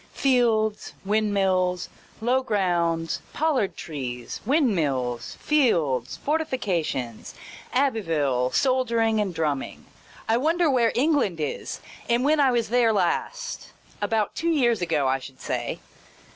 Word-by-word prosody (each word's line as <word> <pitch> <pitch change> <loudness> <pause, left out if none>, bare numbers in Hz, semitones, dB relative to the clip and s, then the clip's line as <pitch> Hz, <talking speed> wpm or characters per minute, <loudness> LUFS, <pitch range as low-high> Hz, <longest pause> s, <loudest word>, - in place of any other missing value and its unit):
Fields, 230 -5 +1
windmills, 195 -4 +1 0.3
low 250 +3 +2
grounds, 175 -8 0
pollard 290 -10 0
trees, 125 -6 -6
windmills, 155 - 0
fields, 160 - +1
fortifications, 190 - -2 0.4
Abbeville, 165 - +1
soldiering 230 - +2
and 200 -3 -1
drumming. 150 -5 -3 0.4
I 225 - +3
wonder 320 +4 +2
where 235 -3 +3
England 265 - +2
is, 150 - -4 0.3
and 240 +2 +2
when 305 +1 +3
I 275 -2 +5
was 235 -3 0
there 240 -1 +4
last 210 - -2
— - - -27
about 220 -3 0
two 335 - -1
years 240 - +2
ago, 160 -5 +1
I 135 +1 +1
should 130 0 -12
say. - - -3
215 Hz, 115 wpm, -25 LUFS, 160-255 Hz, 0.4 s, I